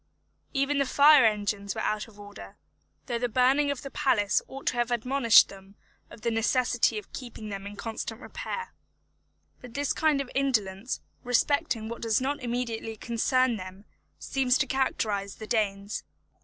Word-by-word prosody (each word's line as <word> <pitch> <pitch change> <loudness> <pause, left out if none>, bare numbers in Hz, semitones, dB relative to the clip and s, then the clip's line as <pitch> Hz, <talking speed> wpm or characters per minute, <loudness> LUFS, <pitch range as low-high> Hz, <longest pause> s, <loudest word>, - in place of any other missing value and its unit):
Even 275 0 +1
the 275 - +3
fire 290 -2 +7
engines 205 -2 0
were - - -3
out 215 +1 -1
of 210 -2 -17
order, 205 0 -11 0.5
though 240 -3 -2
the 245 0 -1
burning 260 +5 +3
of 280 -2 -3
the 275 - -7
palace 240 -9 +2
ought 270 +1 -9
to - - +1
have 240 -1 0
admonished 240 -1 +5
them 195 0 -14 0.3
of - - -13
the 235 - 0
necessity 235 0 +2
of 210 - -8
keeping 235 -4 -8
them 195 -1 -6
in 205 - -8
constant 225 +1 -5
repair. 465 - -6 0.9
But 245 -2 -12
this 285 0 0
kind 310 -3 +2
of 275 -2 -4
indolence 230 -5 -1 0.2
respecting 245 -1 +1
what 235 +1 -6
does 225 -2 +2
not 280 +3 -2
immediately 235 -2 -3
concern 240 +2 +1
them 185 +1 -9 0.3
seems 265 -1 +1
to 295 - +1
characterise 215 -7 -1
the 220 - -8
Danes. 205 -2 -1
235 Hz, 165 wpm, -28 LUFS, 210-265 Hz, 0.9 s, fire